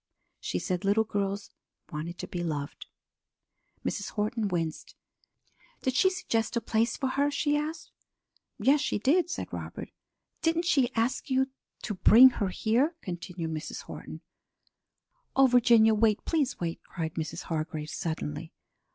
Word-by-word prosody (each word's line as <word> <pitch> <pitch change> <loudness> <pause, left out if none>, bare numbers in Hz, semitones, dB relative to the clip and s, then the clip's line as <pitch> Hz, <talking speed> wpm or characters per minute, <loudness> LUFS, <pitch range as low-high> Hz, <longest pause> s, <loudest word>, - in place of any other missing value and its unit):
She - - -3
said 180 - -2
little 205 +3 +3
girls 200 -1 -3 0.4
wanted 165 +2 -5
to - - -6
be 175 -1 -4
loved." 150 -3 -4 1.0
Mrs. 205 - -2
Horton 215 +1 -1
winced. 165 -4 -3 0.9
"Did 260 - +1
she 375 +9 +4
suggest 230 -13 -1
a - - +3
place 230 0 0
for 270 - -1
her?" 280 +2 +1
she 290 +1 +1
asked. 305 +2 -3 0.7
"Yes, 280 +2 +4
she 295 - 0
did," 320 - +2
said - - -5
Robert. - - -6 0.5
"Didn't 330 +1 +1
she 270 -7 +3
ask 230 +5 0
you 265 0 +1 0.3
to 215 - -2
bring 230 +6 +8
her 200 - +2
here?" 245 - +1
continued 175 -2 -5
Mrs. 155 +1 -5
Horton. - - -9 1.1
"Oh, 270 - +7
Virginia, 235 -3 +6
wait; 215 -1 +2
please 295 -5 0
wait!" 165 -1 -3
cried 160 -3 -5
Mrs. 160 -3 -4
Hargrave 155 -1 -3
suddenly. 155 - -4
220 Hz, 140 wpm, -29 LUFS, 175-265 Hz, 1.1 s, bring